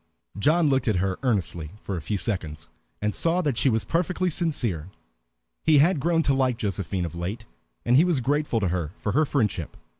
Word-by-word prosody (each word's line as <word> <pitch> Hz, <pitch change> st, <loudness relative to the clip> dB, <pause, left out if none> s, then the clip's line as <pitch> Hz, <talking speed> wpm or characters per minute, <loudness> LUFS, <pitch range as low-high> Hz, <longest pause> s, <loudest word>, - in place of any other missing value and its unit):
John 155 Hz, -, +3 dB
looked 135 Hz, -2 st, +1 dB
at 110 Hz, -, +2 dB
her 95 Hz, +1 st, -1 dB
earnestly 90 Hz, -, -1 dB
for 100 Hz, -, -5 dB
a 85 Hz, -, -4 dB
few 100 Hz, +8 st, -2 dB
seconds, 80 Hz, -, -4 dB, 0.3 s
and 105 Hz, 0 st, +1 dB
saw 170 Hz, +2 st, +1 dB
that 145 Hz, -5 st, 0 dB
she 135 Hz, -, +2 dB
was 110 Hz, -2 st, 0 dB
perfectly 180 Hz, +1 st, 0 dB
sincere. 120 Hz, -, -1 dB, 0.7 s
He 155 Hz, -2 st, +5 dB
had 160 Hz, +3 st, +4 dB
grown 165 Hz, +2 st, +2 dB
to 140 Hz, -, +2 dB
like 130 Hz, -3 st, +1 dB
Josephine 95 Hz, -4 st, -2 dB
of 85 Hz, -, -6 dB
late, 95 Hz, +7 st, -5 dB, 0.4 s
and 120 Hz, -, +4 dB
he 145 Hz, -, +7 dB
was 175 Hz, -6 st, +2 dB
grateful 145 Hz, -1 st, 0 dB
to 95 Hz, -, +1 dB
her 85 Hz, -2 st, -2 dB
for 100 Hz, -, -2 dB
her 155 Hz, +8 st, +3 dB
friendship. 105 Hz, -, -1 dB
115 Hz, 200 wpm, -25 LUFS, 95-150 Hz, 0.7 s, he